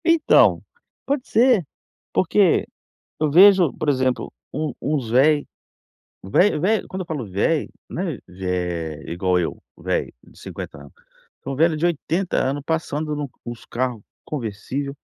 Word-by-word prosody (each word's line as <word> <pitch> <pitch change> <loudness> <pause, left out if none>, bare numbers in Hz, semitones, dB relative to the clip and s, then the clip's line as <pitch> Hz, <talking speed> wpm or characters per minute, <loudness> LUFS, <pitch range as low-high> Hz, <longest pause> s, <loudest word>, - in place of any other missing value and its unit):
Então, 335 -2 +4 0.4
pode 275 -2 -1
ser. 230 -5 +4 0.5
Porque, - - +3 0.5
eu 155 -1 +2
vejo 185 -1 +7
por 155 - -4
exemplo, 130 -2 0 0.2
um 150 0 -2
uns 140 -6 -1
velho. 145 +5 +4 0.8
Vel 150 - +3
velho, 205 +4 +1
quando 190 - -6
eu - - -10
falo 145 -10 -4
velho, 105 - 0 0.2
não 180 - -4
é 165 - -3
velho 90 -4 -3
igual 90 +1 +1
eu, 85 - -3 0.2
velho - - -2
de - - -19
50 - - -8
anos, - - -13 0.5
são 135 - -4
velho 160 +5 +4
de 155 +3 0
80 175 +2 -1
anos, 140 +2 0
passando 155 -1 -2
no 145 -2 -4 0.2
nos 120 -1 -8
carro 125 -3 -3 0.2
conversível, 135 +2 -4
145 Hz, 145 wpm, -22 LUFS, 115-170 Hz, 0.8 s, vejo